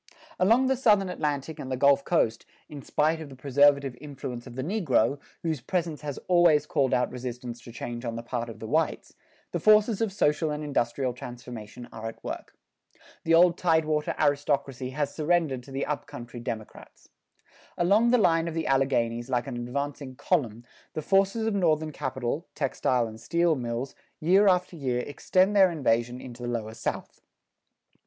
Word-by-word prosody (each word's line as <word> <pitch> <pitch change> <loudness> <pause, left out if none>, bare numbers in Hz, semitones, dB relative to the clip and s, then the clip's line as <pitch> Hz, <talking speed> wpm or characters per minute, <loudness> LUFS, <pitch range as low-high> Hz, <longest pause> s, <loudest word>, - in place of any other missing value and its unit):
Along 230 +8 +4
the 265 +1 +2
Southern 210 -7 +3
Atlantic 150 -3 -3
and 130 - -6
the 130 - -1
Gulf 140 +1 +4
coast, 115 -10 0 0.2
in 145 -2 -9
spite 160 +4 0
of 155 - -8
the 135 - -11
preservative 140 0 +3
influence 135 -4 -7
of 120 - -10
the 130 - -3
negro, 145 - +1 0.2
whose 160 -6 -1
presence 165 +1 -2
has 145 -2 -5
always 175 -5 +5
called 135 -3 +1
out 125 0 +1
resistance 125 -1 -6
to 120 - -11
change 120 +1 -6
on 115 -2 -3
the 115 - -5
part 120 -1 -3
of 115 - -9
the - - -8
whites, 160 +8 -1 0.4
the - - -2
forces 215 0 +4
of 225 -3 +1
social 155 -4 +1
and 150 0 -3
industrial 130 -2 -1
transformation 120 -1 -9
are 110 0 -6
at 115 - -9
work. - - -6 0.7
The 165 0 +5
old 175 0 +5
tidewater 155 -3 +1
aristocracy 140 -3 0
has 145 +2 -2
surrendered 155 -5 +1
to 135 - -13
the 135 +1 -2
up 150 -1 -3
country 120 -4 -9
democrats. 115 -3 -8 0.7
Along 205 +7 +4
the 250 - +5
line 165 -6 +3
of 165 - -4
the 165 - -1
Alleghanies 125 -3 +1
like 125 -2 0
an 135 -3 -5
advancing 135 +2 -4
column, 120 - -1 0.3
the 155 - -4
forces 195 +5 +2
of 220 - 0
Northern 160 -5 +1
capital, 130 +2 -3
textile 130 -3 0
and 110 0 -9
steel 170 0 +2
mills, 120 -1 -3 0.3
year 190 +6 +4
after 180 -1 +2
year 125 -5 -1
extend 185 +7 +1
their 190 -2 +7
invasion 125 -6 0
into 125 -1 -10
the 120 - -3
lower 110 -2 -3
South. - - -5
140 Hz, 175 wpm, -27 LUFS, 125-165 Hz, 0.7 s, their